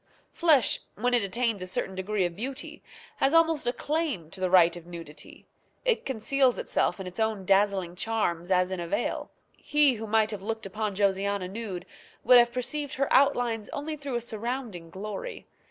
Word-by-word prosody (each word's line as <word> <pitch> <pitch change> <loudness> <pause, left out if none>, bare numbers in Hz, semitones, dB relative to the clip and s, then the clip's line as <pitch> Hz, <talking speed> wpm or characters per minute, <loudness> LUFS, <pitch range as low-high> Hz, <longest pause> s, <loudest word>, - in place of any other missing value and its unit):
Flesh, 305 -9 +4 0.2
when 245 +4 0
it 240 - +4
attains 220 +1 -1
a 185 - -4
certain 190 +1 -2
degree 190 +1 -1
of 175 -1 -3
beauty, 260 +7 -5 0.4
has 275 +4 +2
almost 325 -6 +3
a - - +3
claim 285 - -2
to 190 - -5
the 185 -1 0
right 175 -2 +6
of 175 -1 -10
nudity; 165 -3 -9 0.4
it 485 -2 +1
conceals 265 +1 +2
itself 180 - 0
in 190 - -5
its 180 +3 -7
own 220 -3 0
dazzling 195 -2 +2
charms 180 -5 -1
as 180 0 +2
in 185 - -3
a 170 - -4
veil. - - -2 0.3
He 295 -2 +3
who 220 -1 -6
might 220 0 +2
have 205 -3 -5
looked 220 +1 -4
upon 210 +1 -3
Josiana 200 -1 +1
nude 190 -3 -5 0.4
would 250 -1 +8
have 240 0 +4
perceived 275 +4 -3
her 275 +1 0
outlines 245 -6 +2
only 305 +2 -4
through 285 -4 -5
a 240 - 0
surrounding 225 -6 -4
glory. 210 - -6
215 Hz, 185 wpm, -28 LUFS, 185-255 Hz, 0.4 s, would